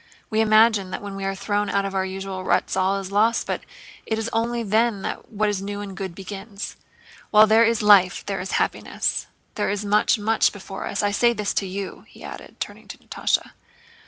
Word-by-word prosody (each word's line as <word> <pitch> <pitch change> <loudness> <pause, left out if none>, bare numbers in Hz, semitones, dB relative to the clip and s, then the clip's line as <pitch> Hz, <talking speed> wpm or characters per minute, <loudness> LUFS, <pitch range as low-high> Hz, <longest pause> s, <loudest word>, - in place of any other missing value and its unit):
We 220 0 +2
imagine 215 -2 +4
that 185 - -5
when 200 -1 -6
we 195 0 -4
are 195 0 -1
thrown 205 +1 -1
out 200 0 +1
of 195 - -4
our 190 -1 +1
usual 190 0 -5
ruts - - +1
all 190 +1 +2
is 195 0 -7
lost, 220 +3 +2
but - - -2 0.5
it 220 - 0
is 225 +1 -3
only 235 +1 0
then 220 -1 +1
that - - -5
what 215 0 0
is 205 -2 -1
new 205 +1 -4
and 200 -2 -7
good 190 -3 -5
begins. 200 +2 -7 0.5
While 215 0 +7
there 220 +1 +5
is 230 -1 +2
life 195 -4 +5
there 195 -1 -3
is 190 - -5
happiness. - - -1 0.3
There 205 - -1
is 205 +1 -2
much, 210 +3 +3
much 220 +1 +2
before 195 -1 -7
us. 200 - -2
I 205 - +2
say 235 +3 +3
this 210 -2 -2
to 195 - -1
you," 195 +1 -6
he - - -15
added, - - -10
turning - - -6
to - - -9
Natásha. - - -1
205 Hz, 215 wpm, -23 LUFS, 195-220 Hz, 0.5 s, While